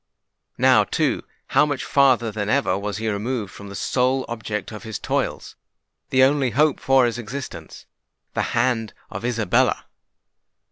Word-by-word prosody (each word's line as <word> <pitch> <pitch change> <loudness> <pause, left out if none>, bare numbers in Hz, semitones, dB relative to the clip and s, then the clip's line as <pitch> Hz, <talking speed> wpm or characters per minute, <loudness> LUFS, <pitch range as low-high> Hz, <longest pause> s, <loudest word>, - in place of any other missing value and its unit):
Now, - - +5
too, - - 0 0.3
how - - +4
much 145 -3 -1
farther 130 -5 +3
than 105 -1 -3
ever 135 -6 +2
was 100 0 -3
he 110 +1 -3
removed 110 0 -2
from 100 -1 -10
the 100 - -8
sole 130 +4 +1
object 110 -4 -4
of 105 - -8
his 110 -2 -5
toils,—the 130 0 -3
only 135 -1 +3
hope 145 +5 +2
of 135 -1 +6
his 120 0 -2
existence,—the 125 +4 -8 0.2
hand 120 -3 +1 0.2
of - - -6
Isabella! 115 -5 +1
120 Hz, 140 wpm, -22 LUFS, 105-130 Hz, 0.3 s, of